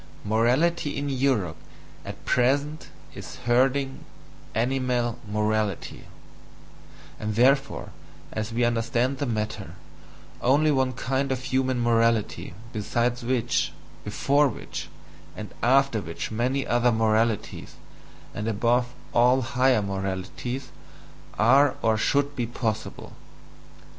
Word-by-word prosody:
MORALITY 125 +10 +1
IN 145 0 -2
EUROPE 125 -11 0 0.5
AT - - -9
PRESENT 140 +5 +1 0.3
IS - - -9
HERDING 135 +2 +2 0.5
ANIMAL 125 0 0
MORALITY, 105 -2 -1 1.1
and 105 -1 -3
therefore, 135 +4 +2 0.4
as 110 +1 -3
we 120 +2 0
understand 120 +3 0
the 145 - -1
matter, 105 -6 -3 0.7
only 145 +4 +4
one 130 -2 +1
kind 135 +2 -1
of 130 -1 -2
human 130 -2 0
morality, 115 -6 +1 0.2
beside 120 +3 -1
which, 120 -1 0 0.3
before 145 +1 +2
which, - - -6 0.5
and 105 -1 -7
after 135 -2 +3
which 85 +3 -5
many 125 +5 0
other 120 0 +2
moralities, 110 -1 0 0.6
and 105 +2 -4
above 120 +3 +1 0.2
all 125 +2 +4
HIGHER 130 -2 +2
moralities, 100 +6 -4 0.7
are 130 +5 +5
or 110 -1 +3
should 140 +6 +1
be 120 -3 -1
possible. 110 -2 -4
120 Hz, 105 wpm, -26 LUFS, 110-135 Hz, 1.1 s, are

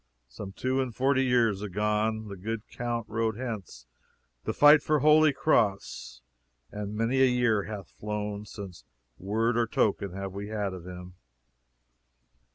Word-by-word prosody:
some 95 +11 -8
two 130 +6 -1
and 125 -4 -4
forty 135 +1 +2
years 115 -6 +2
agone 105 +2 -1
the 100 - -7
good 105 +3 -5
count 120 -1 -3
rode 110 -1 -1
hence 110 - -6 0.6
to - - -1
fight 150 +1 +7
for 155 - +2
Holy 155 +1 +6
Cross, 100 - 0 0.5
and 105 0 -5
many 115 +5 +1
a - - +7
year 120 -5 +2
hath 100 -5 -7
flown 105 -1 -5
since 100 - -9 0.4
word 110 +5 0
or 120 -1 +2
token 100 -3 0
have 95 0 -5
we 100 +1 -5
had 105 -3 -2
of 90 -1 -9
him. 90 0 -9
105 Hz, 150 wpm, -28 LUFS, 100-120 Hz, 0.6 s, fight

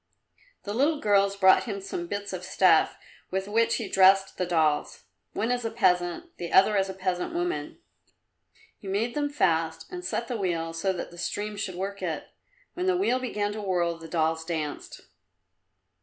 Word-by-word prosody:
The 205 - -4
little 290 +6 +2
girls 200 -3 +3
brought 190 -1 +5
him 205 -4 -4
some 190 -3 -5
bits 200 +1 -4
of 180 -1 -5
stuff 185 -3 +3 0.3
with 190 +1 -2
which 225 +2 +2
he 225 - -3
dressed 195 0 +4
the 180 - 0
dolls 160 -4 +1 0.3
one 225 +3 -1
as 245 -1 -1
a 225 - -1
peasant, 185 - 0
the 170 - -5
other 195 +2 +5
as 195 -1 +1
a 190 - -5
peasant 185 - -2
woman. 355 +1 -2 1.0
He 200 - -11
made 215 +5 -1
them 290 -1 -1
fast 165 - 0
and 360 0 -6
set 235 -8 -2
the 245 - -3
wheel 165 -4 -2
so 165 +4 0
that 180 -2 -5
the 175 - -12
stream 210 +4 -3
should 200 -3 -4
work 195 +2 -4
it. - - -4 0.4
When 360 +1 -2
the 370 -1 +3
wheel 255 -9 +1
began 210 -5 -2
to 210 +1 -5
whirl 175 -4 0
the 165 - -9
dolls 160 -1 0
danced. 160 -3 -5
195 Hz, 185 wpm, -27 LUFS, 175-220 Hz, 1.0 s, brought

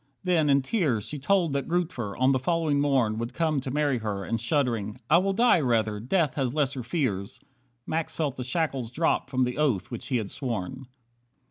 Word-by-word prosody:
Then, 170 -5 +2
in 140 -1 +4
tears, 135 - 0
She 150 - -5
told 170 +1 +2
that 140 -1 -1
Grootver, 160 - -2
on 130 +1 +4
the 130 - +2
following 155 0 +1
morn, 130 -7 +2
Would 115 +2 -4
come 160 -3 +1
to 130 - -5
marry 145 -2 +1
her, 105 -3 -3
and 115 +3 -2
shuddering: 115 -4 -1
"I 170 - +7
will 195 +2 +1
die 235 -2 +4
rather, 110 -6 +1
death 150 - +1
has 130 -2 -1
lesser 140 -3 0
fears." 120 - -2 0.5
Max 160 0 -2
felt 145 -5 -1
the 130 - -4
shackles 135 -3 -1
drop 155 0 0
from 130 -1 +1
the 125 +3 -2
oath 130 -11 +1
which 120 - -6
he 130 - +1
had 105 -4 -4
sworn. 125 0 -4
135 Hz, 200 wpm, -27 LUFS, 115-155 Hz, 0.5 s, I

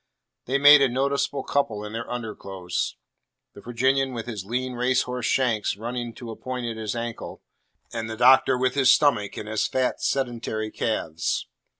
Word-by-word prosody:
They 135 +3 +1
made 145 +1 +8
a 135 - +4
noticeable 140 +1 -1
couple 110 -7 -1
in 105 - -8
their 115 +1 -5
underclothes; 100 -6 -4 0.6
the 100 - -12
Virginian 130 +3 +1
with 115 -2 -5
his 110 -6 -5
lean 125 +5 -3
racehorse 125 0 0
shanks 115 -6 +1
running 120 +2 -4
to 120 -2 -8
a - - -7
point 125 0 -5
at 115 -1 -3
his 110 0 -4
ankle, 115 -1 -6 0.5
and 115 -1 -4
the 110 - -5
Doctor 130 +1 +5
with 130 0 +1
his 135 -2 +5
stomach 120 -9 +2
and 105 - -6
his 110 -1 0
fat 130 -1 -1
sedentary 120 -4 -2
calves. 80 -8 -2
120 Hz, 170 wpm, -25 LUFS, 110-130 Hz, 0.6 s, made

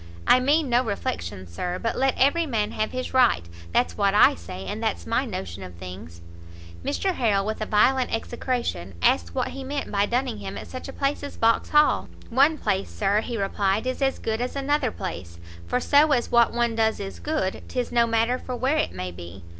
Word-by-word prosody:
I 255 - +6
mean 290 +4 +2
no 245 0 +3
reflections, 95 - -4
Sir, 180 - -3
but 230 +4 -2
let 265 0 +1
every 315 +5 +3
man 215 -6 -1
have 215 0 -2
his 255 0 -4
right. 245 - +4 0.3
That's 250 - +1
what 200 0 +3
I - - +7
say, 90 +3 -8
and - - -4
that's 85 0 -2
my - - 0
notion 95 0 -6
of 90 -2 -9
things." 85 -1 -10 0.6
Mr 380 - 0
Harrel, 205 - +1
with 215 +1 -3
a 215 - -2
violent 255 +5 +3
execration, 225 - -3
asked 85 -1 +2
what - - 0
he 270 - -7
meant 280 +2 -4
by 200 0 +2
dunning 245 - -1
him 100 0 -6
at - - -7
such 255 - -7
a - - -6
place 275 +1 -1
as 285 - -7
Vauxhall? 265 +6 +3 0.2
"One 280 +6 +4
place, 195 -7 -1
Sir," 205 +1 +1
he 235 0 -4
replied, 200 +1 0
"is 255 +2 -3
as 270 -1 +1
good 220 +1 -2
as 250 +2 -3
another 280 -1 +1
place; 85 - -6 0.3
for 250 - +1
so 290 +3 +4
as 245 -3 0
what 235 -1 +5
one 235 -1 0
does 220 -1 +1
is 195 -1 -6
good, 300 -11 -2
'tis 250 -2 -3
no 235 -1 +3
matter 230 +2 +1
for 250 - -5
where 260 +5 +1
it - - 0
may 90 0 -5
be. 85 +1 -10
230 Hz, 210 wpm, -25 LUFS, -, 0.6 s, I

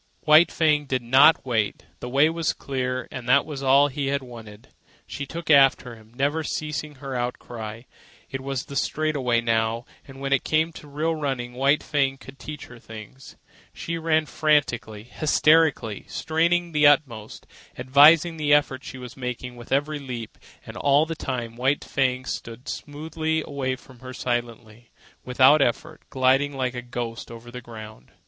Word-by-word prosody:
White 155 +3 +6
Fang 150 -2 +2
did 130 -2 -1
not 135 +6 +5
wait. 110 -5 -1
The 125 - -6
way 140 +4 +4
was 165 0 -1
clear, 130 -2 -3
and 125 -2 -7
that 140 +2 +5
was 145 -3 -6
all 140 +1 +5
he 140 0 -3
had 140 0 -1
wanted. 115 -3 -12 0.4
She 140 -1 -6
took 165 +1 -4
after 135 -4 +4
him, 110 0 -19
never 145 +5 0
ceasing 150 -1 -4
her 135 0 -7
outcry. 120 -2 -5 0.4
It 135 -1 -6
was 135 -1 -4
the 140 - -9
straightaway 140 -6 0
now, 115 0 0 0.2
and 135 -1 -12
when 135 0 -1
it 135 - +2
came 160 +1 +1
to 150 - -12
real 155 +3 -1
running, 135 -6 -3
White 140 +4 +2
Fang 135 -2 0
could 135 0 -14
teach 150 +3 -8
her 125 -1 -14
things. 110 +4 -12 0.4
She 170 0 -4
ran 160 -1 +1
frantically, 140 -10 0
hysterically, 150 -3 +2
straining 170 +2 0
to 150 - 0
the 150 - +7
utmost, 125 -8 0 0.3
advertising 150 +6 +5
the 145 -1 +4
effort 140 -2 0
she 130 - -8
was 125 -2 -9
making 125 -1 -6
with 120 0 -13
every 145 +2 0
leap: 125 -5 -7 0.3
and - - -10
all 145 +2 +3
the 165 - -4
time 125 -7 -5
White 135 +4 0
Fang 130 -1 -1
slid 115 +1 -7
smoothly 160 +1 -3
away 135 -2 -3
from 130 -1 -17
her 130 +1 -9
silently, 120 -2 -4 0.3
without 130 +4 +5
effort, 155 +6 -1
gliding 135 +2 +2
like 130 -1 -1
a 125 - -5
ghost 120 -1 -6
over 115 +1 -11
the 125 +1 -8
ground. 110 - -12
135 Hz, 170 wpm, -24 LUFS, 120-150 Hz, 0.4 s, the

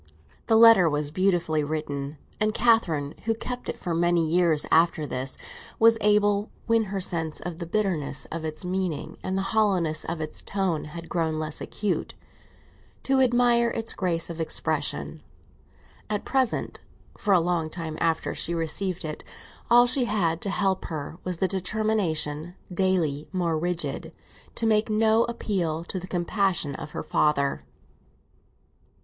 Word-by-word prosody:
The 225 - +5
letter 225 -7 +8
was 145 0 -1
beautifully 170 -4 +1
written, 145 -1 -4 0.2
and 215 0 +1
Catherine, 175 -12 +2
who 225 0 +1
kept 245 +2 -5
it - - -3
for 175 - -3
many 170 0 +2
years 165 -2 +3
after 165 -1 +4
this, 130 -1 -3 0.4
was 225 0 +5
able, 205 0 +3 0.2
when 230 -1 +2
her 195 0 -3
sense 165 -4 -2
of 175 -1 -6
the 170 - -5
bitterness 170 -8 -1
of 165 0 -4
its 155 +2 -4
meaning 180 -4 -3
and 190 +1 -2
the 195 - 0
hollowness 180 -8 +2
of 170 0 -4
its 155 -1 -5
tone 190 -6 -1
had 165 +2 -8
grown 160 -2 -1
less 155 -1 -3
acute, 210 -1 -2 0.9
to 270 -1 +3
admire 240 -1 +4
its 225 0 -3
grace 170 -4 -1
of 170 -1 -7
expression. 160 - -2 0.9
At 210 -1 -2
present, 260 -3 0 0.4
for 210 - -1
a - - +6
long 170 -2 0
time 160 -1 -5
after 165 -1 0
she 170 - 0
received 170 +2 -2
it, 155 -1 -5 0.5
all 240 +1 +7
she 245 +1 +1
had 175 -7 0
to 200 - -2
help 195 -1 0
her 155 +1 -6
was 180 -2 -3
the 190 - +1
determination, 185 -5 -1 0.2
daily 175 -6 0
more 175 -4 0
rigid, 170 +2 -2 0.4
to 230 - -1
make 215 0 +3
no 220 +1 +3
appeal 180 -9 -2
to 185 +2 -3
the 180 - -8
compassion 175 -4 0
of 150 +2 -8
her - - -4
father. 140 -2 +1
175 Hz, 155 wpm, -26 LUFS, 160-210 Hz, 0.9 s, letter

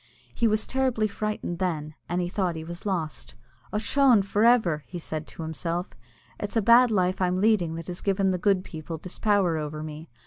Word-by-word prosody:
He 235 - +2
was 215 0 +1
terribly 255 -5 +1
frightened 210 -4 -4
then, 155 -5 -2 0.2
and 175 +1 0
he 175 - -1
thought 180 -2 -1
he 160 - -5
was 170 +5 -7
lost. 165 - -3 0.4
"Ochone! 225 +2 +4
for 205 +2 0
ever," 220 -11 +4
said 160 -2 -5
he - - -11
to 165 - -6
himself, 165 +3 -3 0.5
"it's 205 - -5
the 225 - +3
bad 235 +3 +7
life 185 -3 +1
I'm 180 0 +1
leading 195 -6 +2
that 165 0 -6
has 180 +1 -6
given 195 -1 +1
the 180 - -1
good 195 -1 +2
people 160 -1 -7
this 180 +3 -9
power 195 -7 +2
over 150 0 -5
me. 155 +1 -8
185 Hz, 200 wpm, -26 LUFS, 165-210 Hz, 0.5 s, bad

